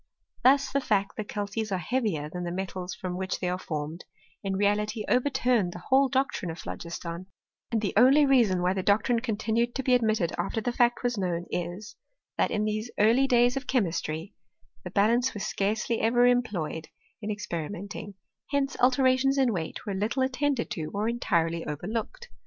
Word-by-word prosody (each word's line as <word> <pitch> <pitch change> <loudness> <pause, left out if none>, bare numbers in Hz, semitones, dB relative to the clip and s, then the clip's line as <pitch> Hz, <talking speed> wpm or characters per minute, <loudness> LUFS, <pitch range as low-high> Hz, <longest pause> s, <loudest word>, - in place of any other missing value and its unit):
Thus 275 +2 +4
the 280 - +1
fact, 200 -4 0
that 215 - -5
calces 205 +1 -3
are 190 - +1
heavier 180 - -1
than 180 +3 -6
the 175 - -3
metals 185 0 -4
from 180 -1 -5
which 190 0 -3
they 180 - -2
are 180 +1 -1
formed, 155 0 -5 0.4
in 195 -1 -1
reality 210 +2 0
overturned 245 -7 +2
the 175 - -9
whole 270 +1 +5
doctrine 265 -8 0
of 165 - -5
phlogiston; 170 +1 -6 0.4
and 225 -2 +1
the 205 - -1
only 275 +4 +6
reason 230 -10 +3
why 180 +1 +2
the 190 - -1
doctrine 215 +5 +2
continued 230 0 -1
to 265 - -2
be 255 - +3
admitted 220 -7 +2
after - - -1
the 245 +3 -1
fact 240 0 +2
was 245 -3 0
known 175 -2 -1
is, 180 +6 -4 0.4
that - - +1
in 210 -1 0
these 215 +2 -2
early 235 +6 +4
days 245 -1 +4
of 270 -1 -4
che 260 - +3
mistry, 165 -2 -3 0.5
the - - -6
balance 235 +5 +2
was 205 - -3
scarcely 215 +3 -1
ever 240 +2 +4
employed 205 -11 0 0.3
in 210 - -4
experimenting: 205 +1 -5 0.3
hence 280 -1 0
alterations 260 +1 +3
in 260 -4 +3
weight 160 -4 -4
were 200 - -2
little 215 +7 0
attended 265 -1 0
to 155 -3 -3
or 210 +2 0
entirely 170 -8 0
overlooked. 215 - -4
215 Hz, 180 wpm, -27 LUFS, 185-245 Hz, 0.5 s, only